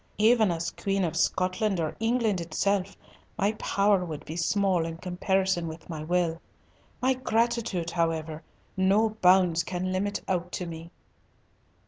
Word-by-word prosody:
Even 220 0 +4
as 165 -1 -2
Queen 195 -1 -1
of 165 - -1
Scotland 185 +1 +1
or 155 -2 -2
England 225 -4 +1
itself, 195 +4 -1 0.4
my 200 +2 +2
power 200 -1 +2
would 160 -4 -6
be 160 - -6
small 185 0 +1
in 165 0 -5
comparison 185 0 0
with 160 0 -9
my 155 -2 -5
will. 170 0 0 0.6
My 260 +1 +4
gratitude, 230 -8 0
however, 160 -2 -1 0.3
no 200 +4 +3
bounds 180 -2 +5
can 185 0 -3
limit 200 +2 -1
out 180 -2 -1
to 180 - -3
me." 165 0 -8
185 Hz, 140 wpm, -27 LUFS, 170-200 Hz, 0.6 s, bounds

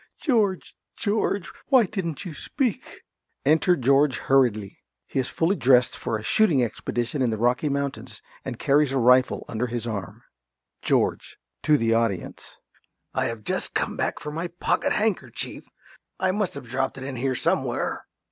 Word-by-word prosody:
George, 215 - 0 0.2
George, 205 -3 0 0.2
why 260 -5 +5
didn't 180 -4 -4
you 175 - -6
speak? 245 - -3 0.4
Enter 160 +5 +4
George 135 -1 +3
hurriedly. 120 -7 +1 0.3
He - - -2
is 130 - -1
fully 170 +5 +1
dressed 125 -5 +4
for 110 - -2
a 110 - -9
shooting 145 - +3
expedition 120 +4 -2
in 125 - +2
the 110 - -1
Rocky 125 +6 +1
Mountains, 140 0 -3 0.2
and 130 -3 -5
carries 145 +1 +3
a 135 - 0
rifle 125 +1 +4
under 115 +2 -2
his 120 -1 -4
arm. 100 -6 -5 0.6
~George~ - - 0 0.2
(to 150 -1 +4
the 115 -3 +2
audience). 115 -6 -2 0.6
I - - 0
have 115 -2 -4
just - - -3
come - - 0
back - - -2
for 150 - -6
my 165 +3 -3
pocket 175 +1 -1
handkerchief. 180 - -2 0.5
I 185 0 +2
must 200 -4 -1
have 140 -3 -8
dropped 135 +3 -2
it 130 - -7
in 130 -1 -5
here 130 +1 0
somewhere. - - -1
135 Hz, 160 wpm, -25 LUFS, 120-170 Hz, 0.6 s, why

